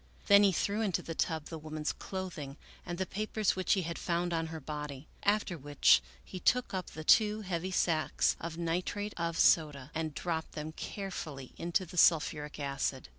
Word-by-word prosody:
Then 200 Hz, 0 st, +7 dB
he 200 Hz, -1 st, +5 dB
threw 205 Hz, +4 st, 0 dB
into 200 Hz, -5 st, 0 dB
the 165 Hz, -, -5 dB
tub 160 Hz, -2 st, -1 dB
the 160 Hz, -, -6 dB
woman's 155 Hz, 0 st, -3 dB
clothing 170 Hz, -7 st, -6 dB, 0.3 s
and 175 Hz, -1 st, -3 dB
the 190 Hz, -, -1 dB
papers 215 Hz, +1 st, 0 dB
which 185 Hz, 0 st, +2 dB
he 190 Hz, -, +1 dB
had 170 Hz, +1 st, -4 dB
found 175 Hz, 0 st, -1 dB
on 165 Hz, -1 st, 0 dB
her 160 Hz, 0 st, -6 dB
body, 150 Hz, -1 st, -6 dB
after 205 Hz, -4 st, +1 dB
which 145 Hz, -, +5 dB, 0.2 s
he 185 Hz, -, -7 dB
took 250 Hz, +6 st, +2 dB
up 185 Hz, -2 st, -2 dB
the 155 Hz, -, -8 dB
two 215 Hz, +4 st, +5 dB
heavy 185 Hz, -2 st, -3 dB
sacks 160 Hz, -5 st, +1 dB
of 165 Hz, 0 st, -5 dB
nitrate 180 Hz, +5 st, -2 dB
of 170 Hz, -1 st, -2 dB
soda 150 Hz, -5 st, +3 dB
and 160 Hz, -2 st, -3 dB
dropped 165 Hz, -2 st, -3 dB
them 155 Hz, +1 st, -5 dB
carefully 160 Hz, -8 st, -6 dB
into 175 Hz, +3 st, 0 dB
the 180 Hz, -, -10 dB
sulphuric 150 Hz, -3 st, +3 dB
acid. 140 Hz, -, -2 dB
170 Hz, 180 wpm, -32 LUFS, 155-190 Hz, 0.3 s, Then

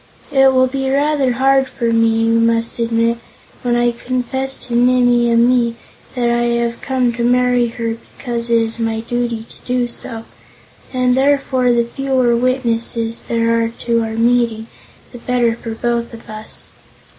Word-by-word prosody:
It 270 Hz, -1 st, +5 dB
will 260 Hz, 0 st, +4 dB
be 265 Hz, +1 st, -2 dB
rather 280 Hz, -1 st, +1 dB
hard 270 Hz, +1 st, +3 dB
for 235 Hz, -2 st, -1 dB
me, 225 Hz, 0 st, +2 dB
you 230 Hz, 0 st, +3 dB
must 230 Hz, 0 st, +1 dB
admit, 230 Hz, 0 st, +1 dB, 0.4 s
when 240 Hz, -1 st, 0 dB
I 240 Hz, 0 st, +2 dB
confess 255 Hz, +2 st, -3 dB
to 245 Hz, -, -6 dB
Nimmie 245 Hz, 0 st, +3 dB
Amee 235 Hz, 0 st, +3 dB, 0.4 s
that 245 Hz, -1 st, 0 dB
I 240 Hz, 0 st, +1 dB, 0.2 s
have 235 Hz, 0 st, -4 dB
come 255 Hz, -3 st, 0 dB
to 235 Hz, 0 st, -3 dB
marry 245 Hz, 0 st, +3 dB
her 230 Hz, -1 st, -4 dB, 0.2 s
because 235 Hz, -2 st, -4 dB
it 235 Hz, -, +4 dB
is 225 Hz, 0 st, -1 dB
my 225 Hz, -1 st, -1 dB
duty 235 Hz, -1 st, -2 dB
to -, -, -16 dB
do 250 Hz, -1 st, 0 dB
so, 225 Hz, -1 st, -8 dB, 0.7 s
and 250 Hz, -1 st, +1 dB
therefore 265 Hz, -2 st, +2 dB
the 235 Hz, -1 st, +2 dB
fewer 255 Hz, -1 st, +1 dB
witnesses 235 Hz, -2 st, -1 dB
there 230 Hz, 0 st, +1 dB
are 225 Hz, -, -1 dB, 0.2 s
to 230 Hz, -1 st, +2 dB
our 220 Hz, 0 st, -4 dB
meeting 230 Hz, -1 st, +1 dB, 0.5 s
the 245 Hz, -, -10 dB
better 240 Hz, -1 st, +1 dB
for 230 Hz, -1 st, -7 dB
both 235 Hz, 0 st, -2 dB
of 225 Hz, -, -15 dB
us. 215 Hz, 0 st, -8 dB
240 Hz, 165 wpm, -17 LUFS, 230-250 Hz, 0.7 s, It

